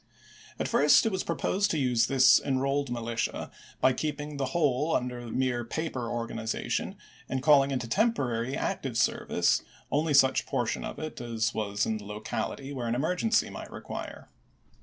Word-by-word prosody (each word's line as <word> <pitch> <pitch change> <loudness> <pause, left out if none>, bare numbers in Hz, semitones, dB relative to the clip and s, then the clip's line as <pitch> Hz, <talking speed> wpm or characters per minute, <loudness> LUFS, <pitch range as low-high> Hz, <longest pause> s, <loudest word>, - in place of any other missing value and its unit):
At - - -1
first - - +5
it 225 - +1
was 190 -1 -1
proposed 200 +2 0
to 160 - 0
use 125 -4 +2
this 130 -2 +6
Enrolled 135 +1 0
Militia 115 -1 -3 0.3
by 130 - +5
keeping 150 +1 -4
the 140 - 0
whole 150 0 +1
under 125 -1 -3
mere 125 0 0
paper 130 -2 -3
organization 115 -1 -3 0.3
and 130 0 -2
calling 140 -3 +6
into 125 -3 -2
temporary 130 - 0
active - - -2
service - - +2 0.3
only 150 +1 +2
such 135 -1 +4
portion 125 -4 -1
of - - -6
it 155 -5 -6
as 115 -1 -1
was 100 -2 -1
in 110 - -1
the 105 - -11
local 105 +1 -3
ity 140 +1 -8
where 125 -3 -3
an 115 - 0
emergency 180 - +1
might - - -8
require. - - -7
130 Hz, 160 wpm, -28 LUFS, 120-145 Hz, 0.3 s, this